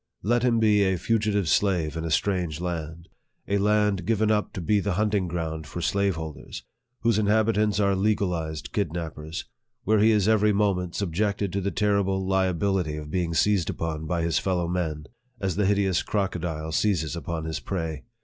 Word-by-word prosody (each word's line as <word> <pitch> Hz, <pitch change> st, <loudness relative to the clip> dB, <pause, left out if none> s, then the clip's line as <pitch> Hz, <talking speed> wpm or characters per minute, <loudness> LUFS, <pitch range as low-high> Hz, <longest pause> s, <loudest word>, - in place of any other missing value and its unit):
Let 120 Hz, +4 st, +2 dB
him 120 Hz, -1 st, +2 dB
be 105 Hz, -2 st, +4 dB
a 95 Hz, -2 st, +2 dB
fugitive 105 Hz, -2 st, 0 dB
slave 85 Hz, -4 st, +1 dB
in 80 Hz, -, -3 dB
a -, -, -2 dB
strange 85 Hz, -2 st, 0 dB
land 85 Hz, -1 st, -5 dB, 0.4 s
a 100 Hz, 0 st, +1 dB
land 105 Hz, -2 st, +2 dB
given 110 Hz, -1 st, +2 dB
up 105 Hz, -1 st, 0 dB
to -, -, -5 dB
be 100 Hz, +4 st, +2 dB
the 100 Hz, -1 st, -1 dB
hunting 105 Hz, -1 st, +1 dB
ground 80 Hz, -2 st, -4 dB
for 90 Hz, -, -6 dB
slaveholders 85 Hz, -4 st, -2 dB, 0.4 s
whose 115 Hz, -2 st, +2 dB
inhabitants 105 Hz, -1 st, +2 dB
are 100 Hz, -1 st, +3 dB
legalized 90 Hz, -6 st, -1 dB
kidnap 85 Hz, -5 st, -2 dB
pers 80 Hz, +2 st, -6 dB, 0.4 s
where 110 Hz, +1 st, +3 dB
he 110 Hz, +2 st, +5 dB
is 105 Hz, -3 st, +3 dB
every 105 Hz, -1 st, +4 dB
moment 95 Hz, -4 st, 0 dB
subjected 100 Hz, +1 st, -1 dB
to 100 Hz, -, -1 dB
the 100 Hz, -, -1 dB
terrible 100 Hz, -2 st, +1 dB
liability 95 Hz, -3 st, +1 dB
of 75 Hz, -1 st, -7 dB
being 85 Hz, -2 st, -1 dB
seized 100 Hz, -1 st, +2 dB
upon 80 Hz, -1 st, -3 dB
by 85 Hz, 0 st, -1 dB
his 85 Hz, -3 st, +1 dB
fellow 90 Hz, -3 st, 0 dB
men, 80 Hz, -4 st, -2 dB, 0.3 s
as 95 Hz, -4 st, -1 dB
the 100 Hz, 0 st, +1 dB
hideous 100 Hz, -3 st, +2 dB
crocodile 85 Hz, -6 st, -2 dB
seizes 85 Hz, -3 st, 0 dB
upon 85 Hz, 0 st, -4 dB
his 80 Hz, -1 st, -3 dB
prey 80 Hz, -6 st, -4 dB
95 Hz, 175 wpm, -26 LUFS, 80-105 Hz, 0.4 s, he